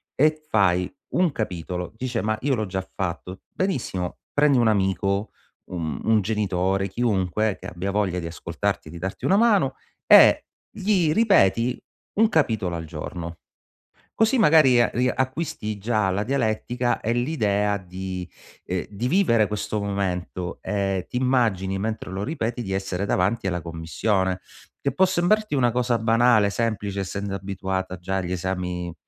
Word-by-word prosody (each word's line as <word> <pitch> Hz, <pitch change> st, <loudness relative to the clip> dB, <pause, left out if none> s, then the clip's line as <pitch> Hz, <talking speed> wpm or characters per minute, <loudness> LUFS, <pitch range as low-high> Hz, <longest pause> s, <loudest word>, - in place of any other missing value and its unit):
e 155 Hz, +2 st, +3 dB
fai 90 Hz, -, +2 dB, 0.2 s
un 180 Hz, -4 st, +2 dB
capitolo, 90 Hz, -3 st, -4 dB
dice: 125 Hz, -1 st, -2 dB
"Ma 110 Hz, 0 st, 0 dB
io 135 Hz, -1 st, +1 dB
l'ho 110 Hz, -, -1 dB
già 95 Hz, -1 st, -4 dB
fatto!" 90 Hz, 0 st, -4 dB
Benissimo, 120 Hz, -, -2 dB
prendi 145 Hz, -2 st, +4 dB
un 120 Hz, -2 st, +4 dB
amico, 100 Hz, 0 st, 0 dB, 0.3 s
u -, -, -8 dB
un 90 Hz, +6 st, 0 dB
genitore, 95 Hz, -2 st, 0 dB
chiunque, 105 Hz, -1 st, 0 dB
che -, -, -8 dB
abbia 90 Hz, +2 st, -4 dB
voglia 95 Hz, -3 st, 0 dB
di 85 Hz, -, -5 dB
ascoltarti, 85 Hz, +1 st, -3 dB
di 85 Hz, -, -9 dB
darti 95 Hz, +2 st, -5 dB
una 195 Hz, -, +4 dB
mano, 220 Hz, -4 st, +3 dB, 0.3 s
e -, -, +7 dB, 0.2 s
gli 190 Hz, -6 st, +1 dB
ripeti 125 Hz, -, +3 dB, 0.4 s
un 220 Hz, 0 st, +5 dB
capitolo 110 Hz, -, +1 dB
al 80 Hz, -, -6 dB
giorno. 85 Hz, +2 st, -6 dB, 0.8 s
Così 225 Hz, +4 st, +4 dB
magari 150 Hz, -, +6 dB
a 115 Hz, -, +2 dB
riacquisti 130 Hz, -1 st, -1 dB
già 105 Hz, -1 st, 0 dB
la 95 Hz, +2 st, 0 dB
dialettica 120 Hz, 0 st, 0 dB
e 115 Hz, -, -1 dB
l'idea 105 Hz, -6 st, +1 dB
di, 90 Hz, -1 st, -6 dB, 0.4 s
ehm, 90 Hz, 0 st, -2 dB
di 105 Hz, +4 st, -3 dB
vivere 125 Hz, -, +3 dB
questo 105 Hz, 0 st, -3 dB
momento 90 Hz, -3 st, -3 dB
e 95 Hz, -1 st, -1 dB
ti -, -, -8 dB
immagini 110 Hz, -7 st, +1 dB
mentre 110 Hz, -2 st, -3 dB
lo 95 Hz, +1 st, -3 dB
ripeti 120 Hz, -5 st, -2 dB
di 95 Hz, -4 st, -4 dB
essere 95 Hz, 0 st, -2 dB
davanti 100 Hz, +3 st, 0 dB
alla 90 Hz, -2 st, -1 dB
commissione. 90 Hz, +3 st, -1 dB, 0.4 s
Che 140 Hz, -, 0 dB
può 190 Hz, -, +4 dB
sembrarti 185 Hz, +1 st, +1 dB
una 120 Hz, -3 st, +3 dB
cosa 120 Hz, 0 st, +1 dB
banale, 115 Hz, -2 st, +4 dB
semplice 105 Hz, -3 st, -2 dB
essendo 100 Hz, +1 st, -4 dB
abituata 95 Hz, -1 st, -3 dB
già 95 Hz, +2 st, -3 dB
agli 90 Hz, -1 st, -2 dB
esami 90 Hz, -1 st, -3 dB
100 Hz, 150 wpm, -24 LUFS, 95-125 Hz, 0.8 s, e